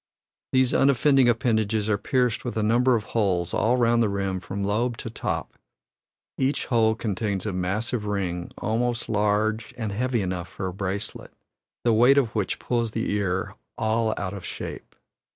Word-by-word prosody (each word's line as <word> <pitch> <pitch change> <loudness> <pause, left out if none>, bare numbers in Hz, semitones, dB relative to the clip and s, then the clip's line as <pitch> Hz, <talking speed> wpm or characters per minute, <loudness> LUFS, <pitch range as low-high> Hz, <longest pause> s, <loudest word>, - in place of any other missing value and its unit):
These 130 -1 +3
unoffending 135 -1 +4
appendages 110 -3 +1
are 105 -2 +1
pierced 125 +1 0
with 120 -2 -4
a 110 - +1
number 120 +4 +4
of 110 - -1
holes 95 -7 0
all 120 +3 +2
round 120 -1 +3
the 110 - +2
rim 95 -1 -1
from 95 +2 -5
lobe 115 +4 0
to 115 - -6
top; - - -4 0.8
each 135 +2 +1
hole 110 -3 +3
contains 105 -3 -2
a 105 - -2
massive 105 +5 -1
ring 90 -4 -2
almost 120 +2 -1
large 105 +2 0
and 110 -4 -3
heavy 120 +1 0
enough 90 -2 -3
for 95 +2 -6
a 90 - -3
bracelet, 100 +2 -4 0.5
the 120 - +3
weight 125 +5 +6
of 120 -5 +2
which 105 -4 -1
pulls 115 -3 -1
the 115 - -1
ear 95 -3 -1 0.2
all 110 0 +1
out 100 -1 -3
of 100 -3 -7
shape. - - -7
110 Hz, 170 wpm, -25 LUFS, 100-120 Hz, 0.8 s, weight